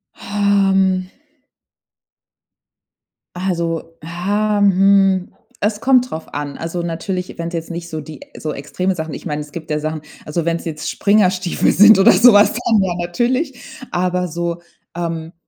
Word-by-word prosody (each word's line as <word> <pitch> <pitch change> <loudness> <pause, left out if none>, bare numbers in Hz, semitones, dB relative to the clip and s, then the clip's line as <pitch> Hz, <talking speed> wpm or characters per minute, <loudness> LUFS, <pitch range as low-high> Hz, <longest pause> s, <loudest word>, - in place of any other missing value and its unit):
Ähm. 195 -2 +1 2.3
Also, 170 -3 -3
ah, 205 +6 -1
hm, 195 -1 +3 0.3
es 210 0 -1
kommt 255 +1 +3
drauf 160 0 -8
an. 145 -1 -5
Also, 165 +1 -4
natürlich, 175 +2 -4
wenn's 170 +1 -5
jetzt 165 0 -4
nicht 170 0 -6
so 155 -1 -5
die 150 -2 -11 0.2
so 155 -1 -4
extreme 185 +6 -2
Sachen 160 -2 -5
Ich - - -8
meine, 150 0 -3
es 150 0 -10
gibt 160 -1 -8
ja 150 - 0
Sachen. 155 0 -4 0.2
Also, 160 +2 -3
wenn's 170 0 -2
jetzt 155 -2 -4
Springerstiefel 190 -3 +2
sind 210 +1 +7
oder 195 - +7
so 240 -2 +6
was, 205 0 +5
dann 230 -3 +1
ja, 185 -2 0
natürlich. 245 - -1 0.3
Aber 180 0 0
so, 170 +1 -4 0.3
ähm, 165 -1 -4
180 Hz, 145 wpm, -18 LUFS, 165-200 Hz, 2.3 s, sind